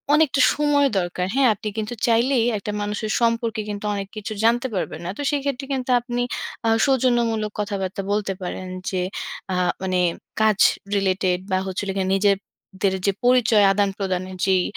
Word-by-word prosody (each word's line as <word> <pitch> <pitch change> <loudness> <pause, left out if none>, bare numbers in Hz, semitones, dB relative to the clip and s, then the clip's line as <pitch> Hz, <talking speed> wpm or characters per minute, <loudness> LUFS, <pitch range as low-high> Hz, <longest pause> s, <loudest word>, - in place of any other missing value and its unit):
অনেকটা 300 -2 +3
সময় 290 -1 +3
দরকার। 180 0 -2
হ্যাঁ? 270 -1 +4
আপনি 210 +1 -7
কিন্তু 220 +2 -3
চাইলেই 235 +1 +3
একটা 205 +1 -4
মানুষের 210 +1 -3
সম্পর্কে, 230 -1 +1 0.3
অনেক 200 -1 -4
কিছু 215 +1 -4
জানতে 240 +3 +3
পারবেন 180 - -3
না। - - -3
তো - - -4
সেক্ষেত্রে 280 -2 -2
কিন্তু 260 -1 -3
আপনি 245 0 -3 0.5
আ - - +4 0.2
সৌজন্যমূলক 235 -5 +1
কথাবার্তা 200 -1 -2
বলতে 205 -1 0
পারেন 185 +1 -5 0.2
যে, 185 -2 -1 0.5
আ - - 0 0.3
মানে 185 -1 0 0.4
কাজ 215 -2 +3 0.4
রিলেটেড 185 -2 +1
বা 185 - +3
হচ্ছিল 195 +1 -3
গিয়ে, 190 -1 0
নিজেদের 195 -1 -1
যে 200 - +4
পরিচয় 235 -4 +5
আদানপ্রদানের 190 -2 -1
যেই 190 -2 +3
210 Hz, 150 wpm, -22 LUFS, 190-240 Hz, 0.5 s, পরিচয়